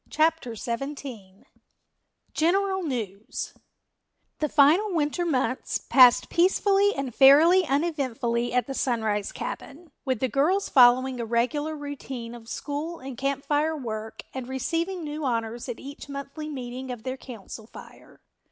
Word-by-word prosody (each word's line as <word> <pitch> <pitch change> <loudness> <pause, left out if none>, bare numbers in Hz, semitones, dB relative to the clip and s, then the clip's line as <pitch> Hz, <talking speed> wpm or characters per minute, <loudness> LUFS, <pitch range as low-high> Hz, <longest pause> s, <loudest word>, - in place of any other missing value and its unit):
CHAPTER 310 -6 +1
XVII 235 -5 -6 0.9
General 380 +4 +1
News 225 - -4 0.9
The 300 - 0
final 325 +8 +4
winter 320 +3 0
months 255 -4 0
passed 250 -3 +6
peacefully 390 +3 +3
and 275 -3 -4
fairly 315 +8 +7
uneventfully 265 -6 -1
at 250 0 +1
the 270 - -5
Sunrise 220 -6 -1
cabin, 310 +3 -7
with 260 -5 -1
the 260 - +1
girls 310 - +1
following 255 0 +5
a 235 - -2
regular 290 +7 0
routine 270 -5 -7
of 235 -1 -11
school 305 +6 -4
and 265 -2 -8
Camp 275 +2 -2
Fire 310 +2 +1
work 220 -4 -6
and 260 -2 -5
receiving 335 +7 -2
new 300 0 -5
honors 235 -1 -2
at 240 - -5
each 285 +1 -10
monthly 280 +2 -6
meeting 255 -2 -6
of 245 -3 -6
their 260 0 -3
Council 225 -4 -10
Fire. - - -14
275 Hz, 135 wpm, -26 LUFS, 240-310 Hz, 0.9 s, fairly